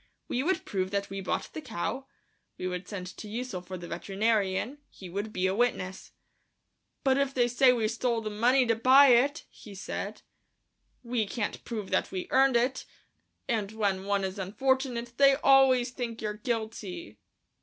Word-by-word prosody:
We 245 - -1
would 370 +7 0
prove 190 -2 -2
that 200 0 -2
we 195 0 -4
bought 185 - -3
the 315 - -5
cow; 260 - -4 0.5
we - - -5
would 180 0 -4
send 195 -4 -6
to 215 - -8
Ussel 225 -3 -4
for 185 +1 -7
the 175 -1 -8
veterinarian... 200 +7 -1
he 185 - -11
would 200 +4 -4
be 185 -2 -1
a 190 - +2
witness. 195 -4 -1 0.9
"But 270 0 +3
if 275 -1 0
they 245 -2 +3
say 250 +2 +5
we 230 -3 +1
stole 235 +1 0
the 215 -1 -4
money 245 +5 +3
to 230 - +3
buy 260 +5 +7
it," 275 +6 +3
he 205 -2 -12
said, 190 - -5 0.8
"we 235 -3 -1
can't 210 0 -3
prove 215 -5 -5
that 185 - +1
we 185 -1 -4
earned 265 -1 +4
it, 250 +3 +1 0.6
and 220 -3 -1
when 200 -3 -1
one 200 -1 0
is 190 +1 -4
unfortunate 240 +4 -1
they 275 -1 +6
always 270 -3 +4
think 240 -2 -5
you're 210 -1 -3
guilty." 210 - -5
225 Hz, 175 wpm, -29 LUFS, 195-255 Hz, 0.9 s, buy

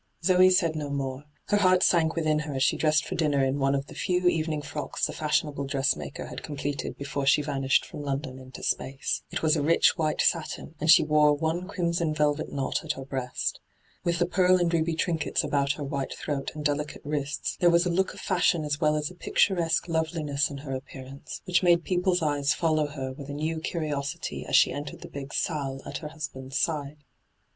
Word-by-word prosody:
Zoe 185 +1 +6
said 170 -4 +2
no 150 -2 -3
more. 135 0 -3 0.2
Her 205 - +4
heart 185 -2 +4
sank 165 -2 +3
within 155 -2 +1
her 150 -2 -4
as 130 - +1
she - - +3
dressed 155 -1 +2
for - - -5
dinner 145 -4 +2
in 135 +2 0
one 135 0 +2
of 135 0 -2
the - - -12
few 180 0 0
evening 155 -3 0
frocks 145 +1 -3
the - - -4
fashionable 150 -2 -1
dressmaker 135 - -1
had - - -7
completed 145 -1 -4
before 140 0 -3
she 145 +2 +5
vanished 135 -2 +1
from - - -8
London 135 -2 -4
into 130 0 -11
space. 135 0 -1
It - - -4
was 155 0 +4
a 150 - 0
rich 165 +3 +3
white 155 -1 0
satin, 165 -1 0
and 155 - -1
she - - +8
wore 150 -1 +4
one 160 +4 -2
crimson 170 -4 -1
velvet 150 0 0
knot 135 -1 -2
at - - -1
her 135 - -8
breast. 130 -2 -3 0.4
With 170 0 +1
the 175 - +2
pearl 185 +1 +4
and 175 -1 +1
ruby 165 0 +1
trinkets 165 -1 0
abont 140 0 +1
her 150 - -5
white 140 -1 -3
throat 140 -3 -3
and 150 -1 -6
delicate 145 0 -2
wrists, 145 0 -2
there 175 -2 +5
was 170 +1 +4
a 180 - +1
look 190 +2 0
of - - -10
fashion 165 -3 +2
as 145 +1 -2
well 155 -1 +3
as 150 +1 -2
a - - -11
picturesque 175 -2 +1
loveliness 160 -3 0
in 140 - -7
her 135 - -4
appearance, 130 +1 -8
which 180 0 +2
made 175 -2 +4
people's 180 -1 +1
eyes 145 -1 +1
follow 155 -2 +1
her 135 -3 -5
with 140 +1 -9
a - - -4
new 160 +2 -2
curiosity 150 -4 -3
'as - - +1
she - - +6
entered 145 0 -6
the - - -8
big 140 0 -7
salle 140 -5 -2
at - - -5
her 155 - -6
husband's 135 -4 -6
side. 150 -2 -2
150 Hz, 210 wpm, -27 LUFS, 140-165 Hz, 0.4 s, she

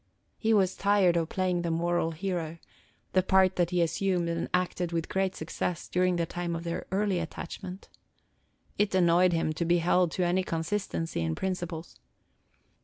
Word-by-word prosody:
He 225 - +1
was 190 -4 +3
tired 200 -3 +3
of 165 -1 0
playing 185 -2 0
the 170 - -2
moral 170 0 +1
hero, 165 -1 -3 0.6
the 185 - +5
part 190 0 +4
that 175 -2 +2
he 175 -1 +2
assumed 175 +1 0
and 170 0 -2
acted 180 -1 0
with 165 -1 -1
great 190 -1 0
success 165 +2 -3
during 180 0 +2
the 170 -1 0
time 175 0 -3
of 165 - -5
their 170 -1 -4
early 195 -1 +1
attachment. 180 +3 -7 0.9
It 205 -2 +2
annoyed 180 0 +5
him 165 -2 0
to 165 - -2
be 170 +1 +3
held 175 +1 +3
to 185 - 0
any 180 +2 +2
consistency 165 - -2
in 80 -1 -1
principles. 175 -3 -4
175 Hz, 170 wpm, -29 LUFS, 170-185 Hz, 0.9 s, the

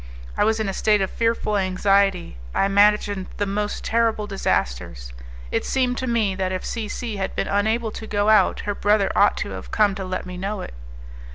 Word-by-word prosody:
I - - +2
was 220 +1 +2
in 220 - -1
a 195 - -2
state 210 +1 +2
of 190 - -1
fearful 230 -2 0
anxiety; 195 - +1 0.2
I - - +3
imagined 200 -1 +2
the 205 - 0
most 205 +1 -3
terrible 225 -2 +1
disasters. - - -2 0.4
It - - 0
seemed 255 -2 0
to 260 - -3
me 225 -5 +1
that 185 -1 -2
if 185 - -4
C 225 -3 -3
C 220 0 -5
had 190 -1 -3
been - - -1
unable 220 +3 0
to 220 - -8
go 205 -1 0
out 215 0 +4
her 205 - -2
brother 205 0 +2
ought - - +4
to - - -7
have - - -8
come 210 -2 +2
to 190 0 -5
let 185 0 -4
me 180 0 -7
know 200 +3 -3
it. - - -8
205 Hz, 205 wpm, -23 LUFS, 190-220 Hz, 0.4 s, out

